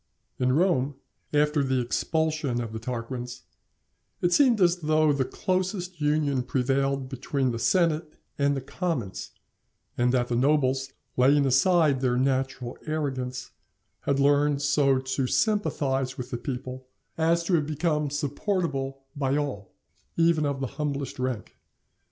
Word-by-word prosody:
In 125 0 +2
Rome, 145 -4 +2 0.4
after 150 0 +2
the 130 -1 +1
expulsion 155 +1 0
of 115 -2 -4
the 110 - -4
Tarquins, 125 +1 -5 0.8
it 175 0 +1
seemed 255 -6 +5
as 175 -1 +4
though 155 -2 +2
the 140 -1 +1
closest 185 -1 -2
union 150 -3 +1
prevailed 135 +1 0
between 130 0 -1
the 115 - -4
senate 155 +4 +1 0.2
and 140 0 +1
the - - -3
commons, 130 - -3 0.7
and 125 0 +3
that 125 -1 +1
the 120 - 0
nobles, 135 0 +2 0.3
laying 140 +3 +5
aside 140 +1 +3
their 125 -2 +1
natural 130 -1 -1
arrogance, 130 -5 -3 0.5
had 140 0 0
learned 145 0 +3
so 140 -2 +3
to 130 0 -1
sympathize 135 - 0
with 125 - -6
the 120 - -2
people 130 -1 -6 0.3
as 165 +1 +2
to 180 - -1
have 155 -4 +2
become 150 -1 0
supportable 145 -2 -2
by 140 -1 0
all, 130 -10 -3 0.5
even 165 -2 +3
of 140 -1 -2
the - - 0 0.2
humblest 140 -2 -3
rank. 125 -4 -4
140 Hz, 140 wpm, -26 LUFS, 130-155 Hz, 0.8 s, seemed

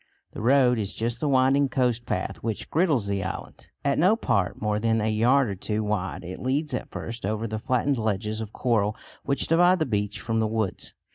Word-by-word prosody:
The - - -6
road 125 0 +4
is 100 -2 -3
just 115 +1 -2
the 150 - 0
winding 135 +1 +3
coast 125 -2 0
path 95 - -2
which 110 -2 -4
girdles 155 - +2
the 100 -1 -1
island. 95 - -7 0.2
At 140 -1 +2
no 185 +7 +5
part 100 - 0
more 105 -1 0
than 115 0 +1
a 105 - 0
yard 125 +5 +3
or 100 - -2
two 105 +3 -2
wide, 100 -4 -2
it 90 +1 -7
leads 140 +3 -1
at 125 - -3
first 115 0 -6
over 110 +3 -1
the 110 -1 -3
flattened 130 +3 0
ledges 110 0 -1
of 110 -2 -6
coral 110 -4 +1 0.3
which 140 - 0
divide 175 +3 +4
the 160 - 0
beach 105 -3 -2
from 115 +4 -1
the 110 - +2
woods. 110 -3 -3
115 Hz, 210 wpm, -26 LUFS, 105-130 Hz, 0.3 s, no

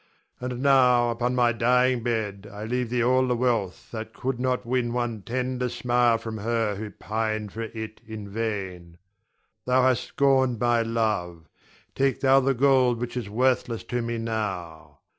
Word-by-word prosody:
And 125 0 -4
now, 125 -3 +5
upon 120 +2 -1
my 120 -1 +3
dying 125 +2 +2
bed, 105 -4 -3
I 105 +1 -7
leave 125 +1 -1
thee 120 0 +1
all 130 +1 +3
the 125 - +1
wealth 115 -6 -1
that 110 -1 -7
could 130 -1 -3
not 125 0 -1
win 120 -1 0
one 120 -3 -2
tender 125 +3 -2
smile 120 -1 +2
for 115 0 -7
her 115 -1 0
who 105 +2 -6
pined 110 +1 -3
for 115 - -5
it 110 -1 -7
in 110 -2 -7
vain. 95 -6 -4 0.7
Thou 125 0 +4
hast 130 -1 +2
scorned 130 -3 +2
my 120 0 +2
love, 105 -8 -2 0.5
take 135 -2 0
thou 135 0 +5
the 135 0 +1
gold 130 -2 +3
which 120 0 -4
is 120 -5 -4
worthless 125 0 0
to 120 - +1
me 115 0 -3
now. 90 -10 -5
120 Hz, 165 wpm, -25 LUFS, 110-125 Hz, 0.7 s, now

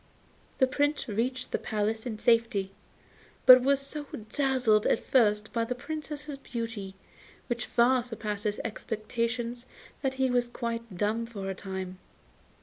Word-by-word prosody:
The 260 - +5
Prince 290 +3 0
reached 250 +4 -2
the - - 0
palace 220 +2 -1
in 220 -3 -4
safety, 230 -4 +2 0.7
but 255 0 +11
was 275 +2 +3
so 290 +1 -5 0.3
dazzled 255 -6 +3
at - - +3
first 210 -4 +2
by 230 - +1
the 250 +2 -2
Princess's 300 +1 -5
beauty, 230 -7 -5 0.5
which 240 -2 -3
far 245 +1 +4
surpassed 215 -3 -5
his 210 0 0
expectations, 230 +2 -3 0.3
that 265 -1 -1
he 260 -1 +1
was 245 -1 +2
quite 230 -4 -4
dumb 220 +4 0
for 200 -4 -5
a - - -2
time. 190 -1 -6
235 Hz, 145 wpm, -29 LUFS, 215-255 Hz, 0.7 s, but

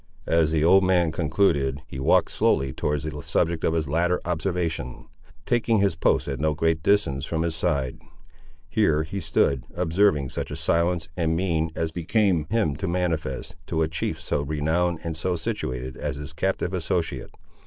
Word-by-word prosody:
As 80 -1 +3
the 80 -1 +2
old 95 +4 +6
man 90 -3 +3
concluded, 75 -4 +1
he 65 - -8
walked 65 - +3
slowly 65 -1 +1
towards 75 +1 -1
the 75 -2 -5
subject 85 -1 0
of 80 - +2
his 80 -2 0
latter 85 +5 +1
observation, 85 -6 -2 0.4
taking 115 -2 +2
his 100 -4 +2
post 65 -4 +1
at 70 -2 -3
no 75 0 +1
great 80 0 +1
distance 80 -9 +2
from 80 +1 -1
his 85 -1 -1
side. 70 -6 -1 0.7
Here 75 0 +2
he 90 +5 -5
stood, 75 -6 +1
observing 85 -5 +2
such - - -4
a - - -5
silence 85 0 0
and 80 -2 0
mien 80 -3 0
as 80 -1 -1
became 90 0 +1
him 110 -11 +1
to 95 - -3
manifest, 85 -7 -2
to 80 - +1
a - - +1
chief 80 -1 -3
so - - -1
renowned 80 +4 0
and 85 -2 -3
so 90 +3 -1
situated 65 -6 -4
as 75 -2 -3
his 75 +2 -8
captive 95 +2 -1
associate. 85 -1 -2
80 Hz, 175 wpm, -25 LUFS, 75-90 Hz, 0.7 s, old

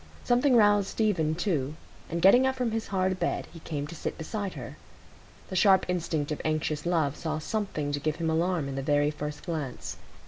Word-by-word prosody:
Something 250 +2 +3
roused 205 -3 +5
Stephen 180 -10 +1
too, 155 -6 -1 0.3
and 170 0 -2
getting 245 +8 +7
up 265 - 0
from 250 -3 -1
his 225 0 -2
hard 185 -1 0
bed, - - -1
he 165 - -10
came 150 -3 -4
to 150 - -8
sit 165 - -4
beside 200 +4 -4
her. - - -7 0.7
The 190 - -5
sharp 190 0 +5
instinct 165 -4 -1
of 150 - -3
anxious 155 0 -1
love 160 -5 +1
saw 155 -1 -3
something 155 -4 -2
to 145 - -1
give 155 +1 -1
him 165 -1 -1
alarm 165 -2 +1
in 140 - -4
the 135 - -2
very 145 +1 +2
first 150 0 -6
glance. 155 -7 -4
165 Hz, 200 wpm, -28 LUFS, 150-195 Hz, 0.7 s, getting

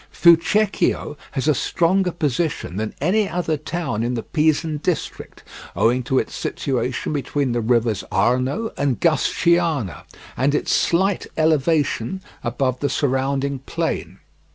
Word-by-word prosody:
Fucecchio 170 0 +3 0.2
has 135 0 -2
a 155 - +5
stronger 180 +6 +1
position 150 - -2
than 110 0 -3
any 195 +7 +1
other 170 -3 -1
town 150 -6 -3
in 120 +2 -1
the 115 - -3
Pisan 155 0 +1
district, 160 +1 -4 0.3
owing 120 +3 +2
to 130 +2 -1
its - - -1
situation 130 +1 -2
between 140 -1 -1
the 120 0 0
rivers 115 -3 +1
Arno 130 - +1
and 140 -4 0
Gusciana 165 - +1 0.3
and 140 +3 +1
its - - -1
slight 190 +3 +1
elevation 155 -1 +1 0.2
above 130 +1 -1
the 145 - 0
surrounding 135 0 0
plain. - - -3
145 Hz, 130 wpm, -21 LUFS, 125-170 Hz, 0.3 s, a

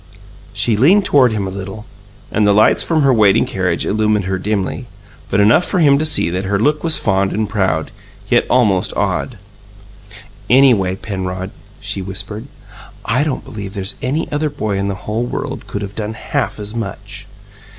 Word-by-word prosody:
She 115 - 0
leaned 180 - +4
toward 130 -7 +4
him 105 -3 -2
a 95 - -4
little, 95 +2 -7 0.5
and 105 -1 +2
the 100 - +4
lights 110 - +5
from 160 -3 +1
her 135 -1 +4
waiting 105 -4 +4
carriage 90 -3 -1
illumined 105 -1 +1
her 95 0 -2
dimly, 105 +4 -2 0.4
but 100 - +1
enough 105 - +5
for 185 - -2
him 140 -5 +4
to 155 - 0
see 155 - +1
that 95 +2 -2
her 100 +1 0
look 150 +8 +1
was 165 -2 +3
fond 95 0 +1
and 110 0 -1
proud, 95 -7 -1 0.4
yet - - +2
almost 105 -8 +2
awed. 120 - -1 1.1
"Anyway, 120 -8 +4
Penrod," 95 -1 -5 0.3
she 100 -1 -4
whispered, 105 +5 -4 0.6
"I 125 +6 +2
don't 150 -4 -3
believe 105 -6 -7
there's 95 0 -2
any 145 +6 -1
other 150 +1 0
boy 110 -9 -3
in 100 - -1
the 95 -2 -5
whole 110 +3 -1
world - - -5
could 100 - -4
of 100 0 -6
done 110 0 -4
HALF 135 0 -3
as 105 +1 -6
much!" 115 -5 -6
105 Hz, 180 wpm, -17 LUFS, 95-125 Hz, 1.1 s, lights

